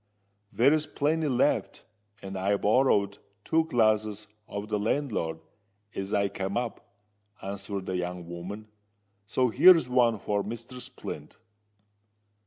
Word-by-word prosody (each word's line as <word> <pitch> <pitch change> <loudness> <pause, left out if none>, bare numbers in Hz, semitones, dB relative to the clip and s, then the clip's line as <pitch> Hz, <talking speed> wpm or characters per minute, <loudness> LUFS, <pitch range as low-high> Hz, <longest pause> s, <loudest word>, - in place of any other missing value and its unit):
"There's 150 +5 +3
plenty 155 +2 0
left—and 105 -5 -2
I 95 +2 +1
borrowed 100 -3 +2 0.3
two 160 0 +2
glasses 110 -5 +1 0.2
of 100 +1 -5
the 105 -1 -1
landlord 105 - -1 0.5
as 95 +1 -4
I 100 -1 +2
came 95 +1 -3
up," 120 -4 -5 0.4
answered 100 0 -5
the 95 - -2
young 90 -1 -4
woman: 95 +5 -7 0.6
"so 125 +3 +2
here's 165 +3 +7
one 120 -3 +3
for 100 +1 -1
Mr. 120 +3 -7
Splint." 75 -9 -8
105 Hz, 115 wpm, -28 LUFS, 100-125 Hz, 0.6 s, here's